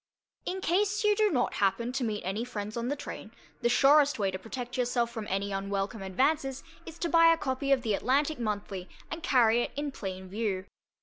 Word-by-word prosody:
In 375 +1 -2
case 400 +4 +1
you 420 0 +4
do 430 0 +3
not 250 -8 0
happen 205 +5 +1
to 260 0 -2
meet 215 -3 -2
any 195 +5 -2
friends 215 -3 -5
on 235 0 -2
the 285 - 0
train, 290 - -8 0.3
the 240 - +2
surest 285 +3 +5
way 200 -3 0
to 185 - -5
protect 245 +3 -6
yourself 240 -1 0
from 220 -3 -6
any 195 +1 -1
unwelcome 195 +2 -2
advances 270 +7 0 0.2
is 330 0 -9
to 340 - -1
buy 330 0 +6
a 330 - +3
copy 275 -1 -2
of 265 -2 +3
the 220 -3 0
Atlantic 280 +7 +1
Monthly 205 -4 -3 0.2
and 320 +1 -4
carry 240 -5 +4
it, - - -1
in 290 0 -2
plain 190 -6 -6
view. 195 -1 -2
240 Hz, 205 wpm, -29 LUFS, 205-290 Hz, 0.3 s, buy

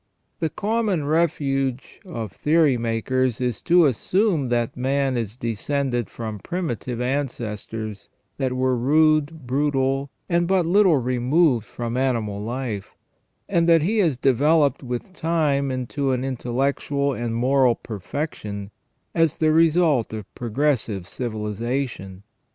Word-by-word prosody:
The 160 - 0
common 205 -3 -1
refuge 140 -5 0
of 115 - -5
theory 150 +3 +3
makers 120 +2 0
is 125 -4 -2
to 175 -1 +5
assume 160 - +1
that 120 -1 0
man 135 +1 0
is 115 -1 -3
descended 120 +1 -2
from 110 -3 -6
primitive 130 - -4
ancestors 115 -5 -3 0.3
that 130 -2 -1
were 130 0 +1
rude, 155 +3 +2
brutal, 135 +1 0 0.2
and 170 -1 +1
but 185 -2 +2
little 185 -2 +4
removed 125 0 +2
from 120 0 -4
animal 115 -6 0
life, 115 -3 -4 0.5
and 170 -3 +2
that 165 -2 +5
he 215 +6 +1
has 165 -10 +2
developed 140 +3 +3
with 125 +7 -5
time 155 -5 +1
into 130 +2 -1
an 125 0 -1
intellectual 135 +2 -1
and 120 -2 -3
moral 130 0 +3
perfection 105 - -5 0.4
as 165 -3 +2
the 155 -1 +3
result 160 -7 +3
of 110 -2 -7
progressive 115 -6 -1
civilization. 110 -2 -4
130 Hz, 120 wpm, -23 LUFS, 120-155 Hz, 0.5 s, to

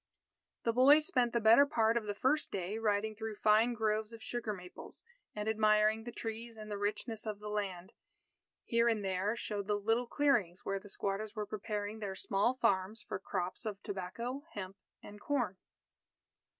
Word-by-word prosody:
The 230 - +1
boy 265 +5 +8
spent 255 -7 +1
the 235 - +1
better 230 +6 +7
part 225 -6 +2
of 235 -2 0
the 205 -1 -3
first 270 +8 +1
day 195 +3 -3
riding 215 0 0
through 220 0 -5
fine 220 +3 +4
groves 215 0 0
of 230 -1 -10
sugar 240 -3 -3
maples, 180 -3 -8 0.3
and 210 0 -3
admiring 215 0 +3
the 240 - -5
trees 225 0 -6
and 215 -1 -8
the 205 - -2
richness 210 +2 -2
of 210 -1 -3
the 210 +1 -7
land. 200 -1 -3 0.7
Here 235 0 +3
and 215 -3 0
there 190 +3 0
showed 205 -3 -4
the 210 -1 +2
little 225 +4 +1
clearings, 235 -12 +1
where 195 0 -1
the 205 +1 -13
squatters 200 +2 -3
were 210 -1 -2
preparing 210 0 -4
their 200 -3 -4
small 205 +6 +1
farms 210 -3 +1
for 195 - -4
crops 180 0 -3
of 210 -3 -4
tobacco, 215 +8 -4
hemp, 190 -2 -5 0.3
and 205 0 -11
corn. 245 -10 0
215 Hz, 175 wpm, -34 LUFS, 205-230 Hz, 0.7 s, boy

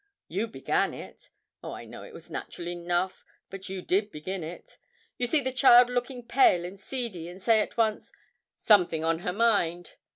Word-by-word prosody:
You 200 +7 -2
began 225 - -1
it. - - -12 0.3
Oh, - - -6
I - - -8
know - - -10
it - - -11
was - - -13
natural 170 - -6
enough, 175 +1 -2 0.3
but 195 0 -8
you 190 -1 -5
did 205 +3 +1
begin 180 +4 -5
it. 165 +3 -10 0.4
You 245 - +1
see 300 +4 +2
the 260 -1 -2
child 250 -2 +6
looking 245 0 -3
pale 235 -8 +4
and 190 +2 -9
seedy, 200 -8 -5
and 180 +2 -11
say 225 +3 +4
at 210 - -3
once, 220 -2 0 0.4
"something 175 -7 +3
on 165 0 +1
her 180 - -2
mind." 180 -6 +1
195 Hz, 185 wpm, -28 LUFS, 175-235 Hz, 0.4 s, child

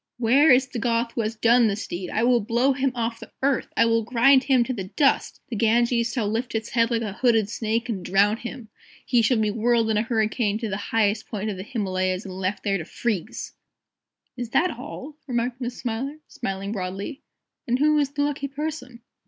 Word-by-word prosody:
"Where 255 +6 +4
is 260 +1 +6
the 250 -2 -5
Goth 230 0 0
who 230 - -2
has 220 +1 -2
done 235 +1 +4
this 210 +1 -2
deed? 175 +1 -5
I 220 - 0
will 245 0 +4
blow 235 +5 +2
him 265 0 0
off 230 -1 -2
the - - -11
earth! 275 -2 +1
I 230 - +5
will 230 0 +2
grind 255 +4 +4
him 260 -3 +4
to 255 - -3
the 195 -6 -4
dust! 275 +8 +1
The 235 - -4
Ganges 235 +2 +2
shall 230 -5 0
lift 230 +3 -2
its 225 -1 -2
head 230 -1 +2
like 230 -1 0
a 205 -3 -4
hooded 225 -2 +2
snake, 230 +1 -1
and 205 -6 -3
drown 200 +4 +3
him! 240 -1 -8 0.4
He 240 - +3
shall 230 +2 +3
be 215 -1 +1
whirled 230 0 +2
in 215 - +1
a - - +3
hurricane 220 -2 0
to 225 -1 -4
the 195 - -2
highest 215 -1 +1
peak 210 -1 -3
of 195 - -6
the - - -5
Himalayas 185 -4 -2
and 190 - -7
left 190 +2 -3
there 195 -2 0
to - - -4
freeze!" 215 -3 -3 0.8
"Is 245 -2 -5
that 350 +8 +2
all?" 275 +3 -8
remarked 245 0 -2
Miss 245 0 -4
Smiler, 255 +5 -3
smiling 195 +1 -4
broadly. 200 +8 -5 0.5
"And 245 +1 +2
who 305 +2 +3
is 285 -2 +1
the 290 -1 0
lucky 290 -1 -2
person?" 275 -4 -6
230 Hz, 215 wpm, -24 LUFS, 215-250 Hz, 0.8 s, is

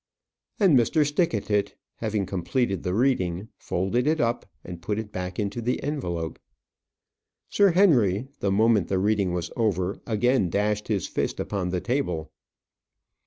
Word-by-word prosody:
And 190 -8 +5
Mr. 145 +5 +3
Stickatit, 105 - 0 0.2
having 105 -3 -1
completed 95 +4 -1
the 90 +1 -2
reading, 105 -6 0
folded 105 +9 -1
it 160 +1 +2
up, 120 -2 0 0.2
and 85 -2 -8
put 105 +4 -2
it 110 -1 -5
back 90 -1 -5
into 105 +3 -2
the 120 +2 -1
envelope. 85 - -3 1.1
Sir 200 -3 +4
Henry, 125 - +4
the 100 - 0
moment 105 -2 +3
the 95 - 0
reading 100 -1 +1
was 85 -1 -3
over, 100 -4 0
again 120 -2 +2
dashed 105 +2 0
his 100 -5 0
fist - - -2
upon 95 -3 -2
the 90 -1 -1
table. 125 - -2
105 Hz, 145 wpm, -25 LUFS, 95-125 Hz, 1.1 s, And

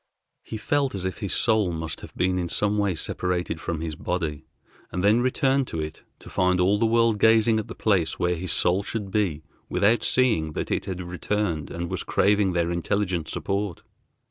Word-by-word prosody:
He 110 - -6
felt 140 +2 0
as 95 -1 -4
if 95 - -3
his 100 - -3
soul 110 -5 +2
must 80 -1 -4
have - - -11
been 90 0 +1
in 85 -1 -2
some 105 +3 +1
way 100 -3 +1
separated 90 -1 -2
from 80 -2 -3
his 80 -2 -4
body, 80 -3 -3 0.5
and 90 - -2
then 105 +4 +4
returned 130 +1 +1
to 80 - -4
it 80 0 -5 0.2
to - - -15
find 90 0 +2
all 95 +3 +3
the 115 - +3
world 115 -1 +3
gazing 110 +1 +5
at 110 - -5
the - - -8
place 95 -7 +1
where 90 0 +1
his 90 0 -3
soul 90 +4 +2
should 100 -1 -4
be 90 -8 0 0.3
without 110 +2 +3
seeing 110 -12 +2
that - - -4
it - - 0
had 95 -2 -4
returned 90 -3 -2
and 85 0 -5
was - - -2
craving 100 -2 +2
their 85 -1 +1
intelligent 90 -1 -1
support. 100 -3 -3
95 Hz, 195 wpm, -25 LUFS, 85-105 Hz, 0.5 s, gazing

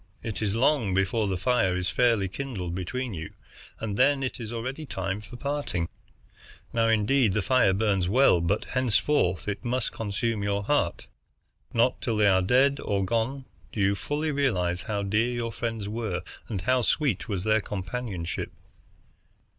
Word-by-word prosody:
It 110 -3 -4
is 105 -1 0
long 115 -6 +2
before 100 +3 +1
the 95 -2 -1
fire 95 -3 +2
is 90 0 -1
fairly 115 -1 +3
kindled 95 -6 -4
between 115 +7 -3
you, 80 -2 -6 0.5
and 105 -2 -3
then 140 +2 +4
it 130 - -3
is 115 -2 -5
already 130 +6 -4
time 95 -6 -3
for 120 - -11
parting. 140 -10 -2 0.9
Now, 115 -1 +3
indeed, 115 +1 +3
the 105 -1 0
fire 130 -5 +4
burns 95 -2 +1
well, 120 -6 +5
but 95 +5 0
henceforth 125 - +1
it 100 -1 -3
must 125 -1 -1
consume 110 +1 -2
your 100 0 0
heart. 120 -8 0 0.7
Not 120 +2 +2
till 115 -3 -1
they 105 - +4
are 95 -1 +4
dead 130 +8 +3
or 100 -2 0
gone 115 +6 -1 0.3
do - - -6
you 100 0 +3
fully 150 +9 -2
realize 90 -12 0
how 105 -3 -2
dear 105 +5 +1
your 115 -1 -2
friends 115 -3 -3
were 105 -5 -3 0.2
and 100 -5 -3
how 130 +5 +2
sweet 125 - +1
was 95 -3 -2
their 110 0 +3
companionship. 95 -3 -4
110 Hz, 165 wpm, -27 LUFS, 95-125 Hz, 0.9 s, well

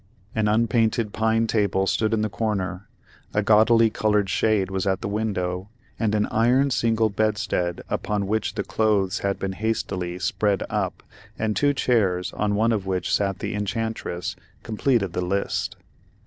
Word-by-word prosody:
An 110 -2 +1
unpainted 110 0 +1
pine 110 +1 +2
table 100 -3 +1
stood 110 +2 +1
in 110 -1 +1
the - - +1
corner, 95 -1 -3 0.5
a 105 - +2
gaudily 110 +2 +5
colored 105 -2 +1
shade 105 -4 +1
was 95 +1 -1
at 95 -1 0
the - - -3
window, 100 -3 -2 0.3
and 110 -2 +1
an 105 - +2
iron 125 +5 +3
single 115 -2 +2
bedstead 105 -5 -1
upon 105 -1 -1
which 110 +2 -1
the 100 - -1
clothes 105 -1 +1
had 100 0 -1
been 95 -1 -3
hastily 95 -4 -2
"spread 95 +2 0
up," - - -2 0.3
and 110 -1 -1
two 145 0 +2
chairs, 95 -9 +1
on 105 -1 0
one 115 +3 +2
of 100 -4 -1
which 95 -2 -1
sat 100 -2 +1
the 105 +1 -4
enchantress, 105 -3 -3 0.3
completed 110 -4 0
the - - -1
list. 100 +3 -1
105 Hz, 160 wpm, -24 LUFS, 95-110 Hz, 0.5 s, gaudily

